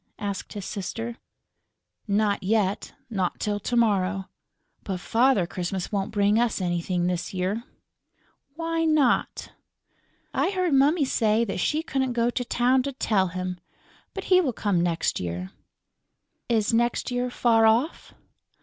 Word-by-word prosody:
asked 200 -3 -5
his 205 -2 -6
sister. 225 +4 -5 0.9
"Not 205 0 +1
yet; 200 0 0 0.2
not 190 -4 -1
till 205 -1 -1
to 240 +4 -3
morrow. 195 -4 +1 0.5
But 190 -2 -3
Father 230 +1 +3
Christmas 180 +1 -4
won't 200 -1 -1
bring 205 0 +2
us 235 -3 +1
anything 175 0 -1
this 180 +1 -2
year." 195 +6 -2 0.9
"Why 330 0 -1
not?" 305 -6 +1 0.8
"I - - +1
heard 365 -5 0
Mummy 285 +3 +4
say 225 -2 +2
that 195 -3 -4
she 310 - 0
couldn't 265 -5 -1
go 235 0 +1
to 245 - -2
town 250 +2 +2
to 275 +2 -4
tell 205 -7 +1
him. 180 0 -4 0.6
But 390 - -4
he 365 - +7
will 270 -8 -1
come 200 -5 0
next 170 -1 0
year." 90 +1 -4 1.0
"Is 225 -2 +1
next 240 +2 +1
year 245 0 -1
far 225 -2 +3
off?" 240 +9 0
220 Hz, 140 wpm, -25 LUFS, 190-250 Hz, 1.0 s, he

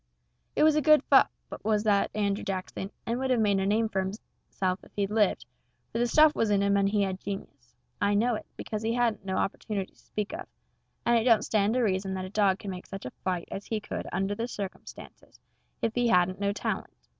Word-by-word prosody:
It - - +3
was 310 -1 +5
a 305 - +3
good 305 +1 +5
pup, - - +7 0.3
was 215 -1 +1
that 205 -2 +3
Andrew 200 -1 0
Jackson, 190 0 -4 0.2
and 235 +2 -1
would 265 0 -1
have 250 -2 +3
made 205 -3 +3
a 190 - 0
name 220 +2 +2
for 195 -3 -1
hisself 190 -1 -4
if - - -17
he'd 200 -1 -1
lived, 215 -2 +2 0.5
for 230 - -2
the 240 - +2
stuff 305 +4 +6
was 225 - +1
in 200 -1 +3
him 200 0 +3
and 200 0 +3
he 205 0 +2
had 190 -1 -2
genius 140 - -8 0.3
I 205 0 +3
know 235 +4 +2
it, 215 - -5
because 215 -1 -4
he 225 +1 0
hadn't 235 -5 0
no 190 -1 -1
opportunities 195 -1 -3
to - - -29
speak 210 +5 -3
of, 360 +3 -6 0.6
and 235 0 +4
it - - -1
don't 230 -3 +4
stand 215 +1 +2
to 255 - +2
reason 190 -2 0
that 185 0 -3
a - - -7
dog 200 -3 +3
could 200 - -6
make 180 -1 -8
such 195 0 -7
a 125 - -5
fight 180 -2 -1
as 195 - -6
he 220 - -1
could 210 - -5
under 195 +1 0
them 230 +3 -3
circumstances 200 -5 -9 0.4
if 230 - +1
he 245 0 +2
hadn't 185 -2 +3
no 200 0 +1
talent. 200 - -3
205 Hz, 230 wpm, -28 LUFS, 195-225 Hz, 0.6 s, pup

